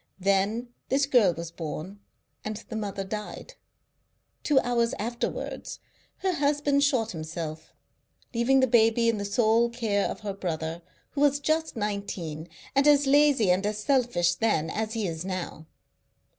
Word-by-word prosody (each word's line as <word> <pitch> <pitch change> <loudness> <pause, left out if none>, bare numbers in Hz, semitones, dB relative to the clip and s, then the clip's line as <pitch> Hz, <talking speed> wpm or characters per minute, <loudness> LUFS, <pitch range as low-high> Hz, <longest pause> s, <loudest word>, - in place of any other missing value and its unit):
Then 200 +5 +1 0.2
this 275 +1 +3
girl 240 -9 +4
was 170 +1 -6
born, 170 +4 -6 0.4
and 215 0 -4
the 225 - -5
mother 200 -2 -3
died. 210 - -6 0.9
Two 290 -3 +3
hours 235 -1 0
afterwards 235 +3 -4 0.5
her 380 -1 +2
husband 285 -1 +2
shot 250 -6 +1
himself, 160 -1 -6 0.6
leaving 255 +3 +3
the - - +5
baby 230 -1 +4
in 225 -2 0
the 200 - -3
sole 225 +2 +3
care 225 -4 0
of - - -6
her 205 -2 -4
brother, 165 -3 -4 0.3
who 280 - -3
was 285 -1 +4
just 315 +2 0
nineteen, 200 -7 -4 0.3
and 275 +2 +4
as 290 -1 +5
lazy 275 -7 +4
and 185 +2 +1
as 210 +1 -1
selfish 210 -8 +2
then 175 -5 0
as 220 0 -2
he 225 -3 -1
is 165 -1 -4
now. 180 -4 -5
220 Hz, 150 wpm, -27 LUFS, 185-260 Hz, 0.9 s, the